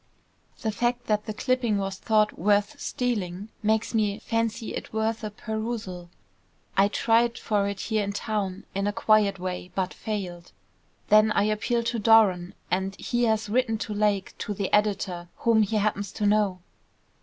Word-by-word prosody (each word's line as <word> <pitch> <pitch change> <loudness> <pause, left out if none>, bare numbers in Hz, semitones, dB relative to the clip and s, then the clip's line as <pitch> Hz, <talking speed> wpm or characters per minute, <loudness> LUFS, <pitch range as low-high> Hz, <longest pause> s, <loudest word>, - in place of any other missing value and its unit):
"The 220 - +1
fact 240 +3 -1
that 210 -1 0
the 215 - -3
clipping 250 -3 +1
was 195 -1 -3
thought 215 -1 +2
worth 205 +2 +1
stealing, 205 -5 -2
makes 220 +1 +1
me 210 -2 +1
fancy 230 0 -2
it - - -6
worth 220 +1 -1
a 215 - -2
perusal. 215 -5 -5 0.7
I 195 +1 +5
tried 230 +3 +2
for 205 -2 0
it 200 -1 -4
here 220 -2 0
in 200 - -2
town, 200 -2 -3
in 195 +1 -1
a 205 - 0
quiet 210 -2 +3
way, 180 0 -5
but 190 -1 -1
failed. 180 -5 -5 0.6
Then 215 +1 +6
I 200 - +3
appealed 225 +3 0
to 230 0 -1
Doran, 200 -5 +4 0.2
and 190 +1 0
he 240 0 0
has 220 -1 +1
written 225 0 +1
to 215 -1 -4
Lake, 205 -2 0
to 210 - -3
the 195 -1 -3
editor, 195 -4 +1
whom 230 -2 +3
he 215 +1 0
happens 205 -2 0
to 210 - -2
know." 205 -3 +2
210 Hz, 165 wpm, -26 LUFS, 195-225 Hz, 0.7 s, Then